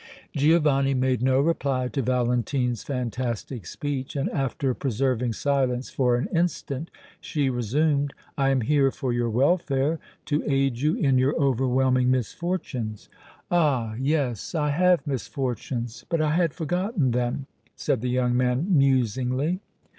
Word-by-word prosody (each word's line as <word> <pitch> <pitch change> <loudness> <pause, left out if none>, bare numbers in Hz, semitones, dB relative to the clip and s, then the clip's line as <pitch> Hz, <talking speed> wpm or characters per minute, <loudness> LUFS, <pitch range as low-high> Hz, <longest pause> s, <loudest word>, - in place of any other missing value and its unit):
Giovanni 145 -2 +3
made 130 -1 +1
no 130 +1 +3
reply 140 -4 +1
to 135 - -2
Valentine's 125 0 0
fantastic 125 - -4
speech, 140 -2 -4
and, 140 - -1
after 135 -1 -1
preserving 125 -1 0
silence 130 -1 0
for 125 -2 +2
an 120 - -1
instant, 165 -3 -1 0.3
she 140 -4 -1
resumed: 140 +4 +1 0.2
"I 135 -1 +2
am 135 -2 +2
here 140 +3 +3
for 130 -3 -3
your 120 -1 0
welfare, 140 +3 +1 0.3
to 150 0 0
aid 135 -3 +1
you 150 +5 +2
in 135 -4 +2
your 130 +3 +2
overwhelming 130 -2 +2
misfortunes!" 130 - -2 0.4
"Ah! 140 -10 +2
yes; 135 - -1
I 150 -2 +1
have 180 +3 +3
misfortunes, 125 -3 -3
but 165 - +1
I 155 -1 +2
had 165 -1 +1
forgotten 175 - 0
them," 125 +3 -1 0.3
said 125 - -1
the 125 - -1
young 125 -1 +1
man, 130 +9 +1
musingly. 130 - +2
135 Hz, 135 wpm, -25 LUFS, 125-145 Hz, 0.4 s, Giovanni